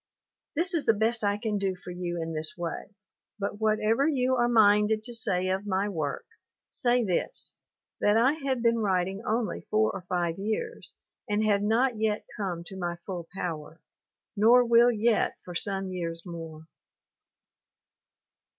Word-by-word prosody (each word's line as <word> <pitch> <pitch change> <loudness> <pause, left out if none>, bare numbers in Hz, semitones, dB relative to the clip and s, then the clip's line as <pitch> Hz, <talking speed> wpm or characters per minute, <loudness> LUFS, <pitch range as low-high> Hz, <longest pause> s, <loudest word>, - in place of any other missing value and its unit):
This 355 +5 +2
is 325 -4 -1
the 225 - +5
best 225 +2 0
I 205 0 +1
can 210 -1 -2
do 195 -1 -1
for 180 0 -10
you 175 -1 -4
in 165 0 -4
this 155 0 -3
way, 175 +4 -5 0.4
but 205 0 -4
whatever 220 +5 +2
you 260 -4 +1
are 240 -1 +2
minded 215 -1 +4
to 240 - -2
say 185 -5 0
of 190 +2 -2
my 195 +1 0
work 155 -7 -3 0.5
say 245 0 +2
this 185 -5 -2 0.4
that 205 - +3 0.2
P 275 - -6
have 260 -3 0
been 230 0 +3
writing 190 -1 0
only 225 +1 -2
four 215 0 +2
or 195 - -6
five 175 -1 -1
years 220 - -4 0.3
and 210 +1 +1
have 205 -2 +3
not 225 +3 +1
yet 215 -1 0
come 185 -6 -3
to 190 - -10
my 175 -1 -2
full 175 -4 -5
power, 165 -3 -5 0.6
nor 235 +4 +6
will 235 +1 +6
yet 225 0 +1
for 180 - -7
some 195 +1 0
years 170 -1 -5
more. 165 -2 -8
205 Hz, 160 wpm, -28 LUFS, 180-230 Hz, 0.6 s, nor